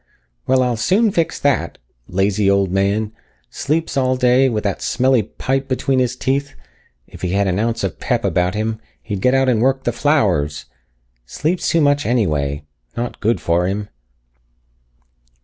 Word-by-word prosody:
"Well, 130 0 +3
I'll 125 -2 0
soon 200 - +2
fix 165 -2 -1
that! 140 -12 0 0.3
Lazy 100 +2 +1
old 100 -2 +2
man! 100 +3 0 0.4
Sleeps 160 +3 -2
all 130 -1 +1
day 125 +1 +4
with 110 -3 -2
that 100 -2 -2
smelly 130 -1 +2
pipe 135 +6 -3
between 130 0 0
his 125 -1 0
teeth. 140 +2 -2 0.5
If - - -14
he 90 0 -2
had 100 +1 +2
an 95 0 0
ounce 115 0 -1
of 95 - -3
pep - - -1
about 90 +2 +1
him, 110 +1 -2 0.2
he'd 100 -4 -4
get 125 +4 +3
out 135 0 +3
and 120 -4 +2
work 135 +1 +1
the - - 0
flowers. 90 - +1 0.6
Sleeps 160 - -1
too 165 - +2
much 145 0 +2
anyway. 75 - 0 0.3
Not 120 +1 -4
good 115 +2 +1
for 85 +1 +1
him." 100 +2 -3
115 Hz, 165 wpm, -19 LUFS, 100-135 Hz, 0.6 s, day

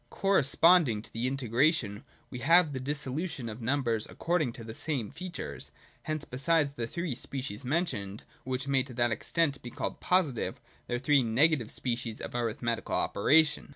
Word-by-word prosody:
Corre 195 -2 +2
sponding 140 -5 +4
to - - -14
the 115 +3 -1
integration 130 -3 +1 0.3
we 125 - -6
have 165 +4 +5
the 130 - -3
dissolution 140 0 -3
of 110 +2 -7
numbers 115 -3 0
according 165 -7 0
to 115 - -9
the 110 0 -7
same 130 -4 -2
features. 175 +4 -6 0.3
Hence 155 -1 -4
besides 145 +3 +2
the 120 -4 -4
three 170 +3 -3
species 130 -1 -5
mentioned, 125 - -2 0.2
which 130 +1 -3
may 135 -1 +3
to 130 -2 -7
that 120 0 +2
extent 140 +4 0
be 120 - -7
called - - -4
positive, 170 -10 0 0.3
there 120 - -1
are - - -2
three 140 +1 +4
negative 125 +1 +2
species 115 -3 -2
of - - -6
arithmetical 120 0 -2
operation. 150 -1 +3
130 Hz, 165 wpm, -30 LUFS, 120-155 Hz, 0.3 s, have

